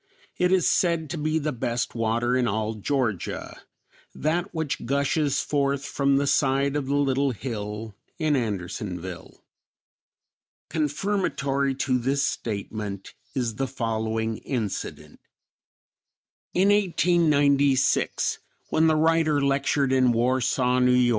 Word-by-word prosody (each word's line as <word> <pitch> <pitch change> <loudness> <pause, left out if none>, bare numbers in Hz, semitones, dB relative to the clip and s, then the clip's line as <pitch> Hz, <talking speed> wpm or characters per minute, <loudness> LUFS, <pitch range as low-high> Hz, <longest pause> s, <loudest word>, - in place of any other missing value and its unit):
It 180 0 +3
is 185 -2 +3
said 170 -4 +1
to 175 - -3
be 155 +1 0
the 155 -1 -1
best 120 -1 -2
water 115 +2 0
in 125 -1 +2
all 110 0 -1
Georgia; 110 -2 -2 0.5
that 170 +5 -1
which 160 -7 -3
gushes 140 +2 +1
forth 140 -1 0
from 140 -1 +1
the 140 - +1
side 140 0 +2
of 145 -3 -2
the 140 - 0
little 140 -1 +2
hill 105 -2 -5 0.2
in 155 -2 +1
Andersonville." 95 -5 -4 1.3
Confirmatory 145 -4 0
to 130 -1 0
this 135 +3 0
statement 105 -4 -4 0.2
is 120 -5 -2
the 135 - -1
following 110 -2 -2
incident: 115 -7 -5 1.4
In 190 +2 +4
1896, 150 -8 +2 0.3
when 160 +1 +4
the 160 - +3
writer 160 -1 +3
lectured 140 -1 +1
in 130 -2 +4
Warsaw, 125 +1 +1
N. 125 0 +4
Y. 125 -1 +4
135 Hz, 120 wpm, -25 LUFS, 115-150 Hz, 1.4 s, In